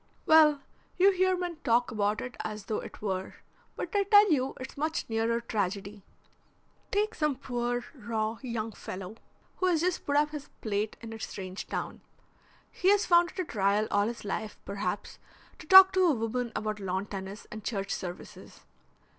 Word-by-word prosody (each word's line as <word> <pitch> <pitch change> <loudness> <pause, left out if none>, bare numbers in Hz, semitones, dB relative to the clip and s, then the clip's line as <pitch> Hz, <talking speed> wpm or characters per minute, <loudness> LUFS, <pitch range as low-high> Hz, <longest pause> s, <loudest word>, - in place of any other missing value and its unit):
"Well, 305 -3 +6 0.4
you 390 +2 +6
hear 375 -1 +2
men 350 -2 -4
talk 240 -5 +1
about 210 -1 0
it 250 - -6
as 210 -1 -5
though 215 - -2
it - - -10
were, 190 -2 -3 0.4
but - - -4
I 405 - +4
tell 410 0 +6
you 265 -3 +1
it's 260 - -8
much 310 +3 -2
nearer 225 +1 0
tragedy. 205 -2 -3 0.9
Take 420 +2 0
some 300 -3 0
poor, 245 -2 -2
raw, 225 -4 -3
young 230 -3 -3
fellow 195 +1 -8 0.4
who 370 - +1
has 335 -4 +2
just 360 0 0
put 285 - +1
up 300 +1 +3
his 290 -2 -7
plate 210 0 -2
in 225 -1 -8
a 225 - -8
strange 190 -2 -6
town. - - -4 0.7
He 370 - +1
has 410 0 +4
found 345 -1 +5
it - - -11
a - - -4
trial 205 -3 +1
all 205 +1 +2
his 235 -2 -6
life, 210 +1 -4
perhaps, 200 +1 -4 0.4
to 305 - -12
talk 380 +1 +10
to 375 -1 +4
a 310 - +3
woman 235 +1 -2
about 215 -1 -2
lawn 190 0 -2
tennis 195 +1 -7
and 215 0 -7
church 195 -4 -2
services. 175 -1 -8
235 Hz, 180 wpm, -29 LUFS, 210-315 Hz, 0.9 s, talk